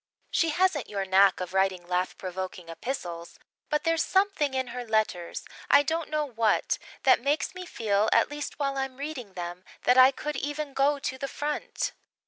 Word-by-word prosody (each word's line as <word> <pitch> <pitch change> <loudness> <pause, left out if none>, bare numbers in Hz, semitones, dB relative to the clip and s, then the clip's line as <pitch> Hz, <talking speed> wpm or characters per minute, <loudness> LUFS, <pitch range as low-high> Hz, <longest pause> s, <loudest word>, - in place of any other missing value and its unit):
She 330 - +2
hasn't 340 -3 +1
your 200 -2 -2
knack 190 0 +5
of 180 0 -5
writing 190 -2 +1
laugh 180 +1 -1
provoking 185 -2 -6
epistles, 170 -4 -5 0.3
but 300 -1 +1
there's 330 -1 +2
something 380 -8 +1
in 260 -1 -1
her 250 0 -4
letters 215 -6 -1 0.2
I 285 - +7
don't 320 +2 -2
know 305 -1 0
what 230 -5 +1 0.2
that - - +5
makes 285 +7 0
me 365 -1 -8
feel 215 - +1
at - - +4
least 295 0 -5
while 275 -1 -1
I'm 265 -1 -3
reading 275 -8 -6
them, 175 0 -6 0.2
that 250 +1 +5
I 255 +1 +10
could 295 +1 -4
even 290 +1 -3
go 280 +2 +3
to 260 -1 -4
the 275 - -2
front. 295 +2 -3
260 Hz, 180 wpm, -28 LUFS, 190-295 Hz, 0.3 s, I